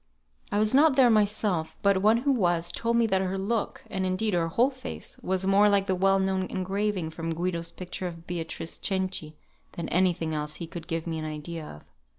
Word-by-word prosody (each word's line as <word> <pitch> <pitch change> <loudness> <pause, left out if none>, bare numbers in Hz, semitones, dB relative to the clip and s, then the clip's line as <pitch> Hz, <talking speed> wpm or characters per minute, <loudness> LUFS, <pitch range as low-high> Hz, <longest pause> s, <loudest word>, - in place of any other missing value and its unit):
I - - +1
was 215 +2 +3
not 290 +1 +6
there 255 -3 +6
myself; 205 -6 +1
but 200 -1 +3
one 215 +3 +5
who 275 +4 +1
was, 175 -8 +1
told 230 +4 0
me 235 - +4
that 190 -3 +2
her 190 0 -1
look, 205 +3 -2
and 190 -2 -3
indeed 185 +3 0
her 170 -2 +1
whole 240 +11 +2
face, 260 0 -7
was 190 -3 -1
more 200 +2 +5
like 200 -1 +3
the 190 - +1
well 195 +1 +3
known 190 -1 0
engraving 190 -2 -2
from 165 0 -4
Guido's 170 -1 -2
picture 180 +1 -5
of 165 -1 -9
"Beatrice 165 -1 -5
Cenci" 185 -5 -2 0.4
than 170 - -4
any 185 +1 +3
thing 165 -2 -4
else 150 0 -3
he 170 - -5
could 165 0 -8
give 165 0 -2
me 165 -2 -3
an 155 - -4
idea 155 +1 -5
of. 75 - -13
185 Hz, 210 wpm, -27 LUFS, 165-205 Hz, 0.4 s, not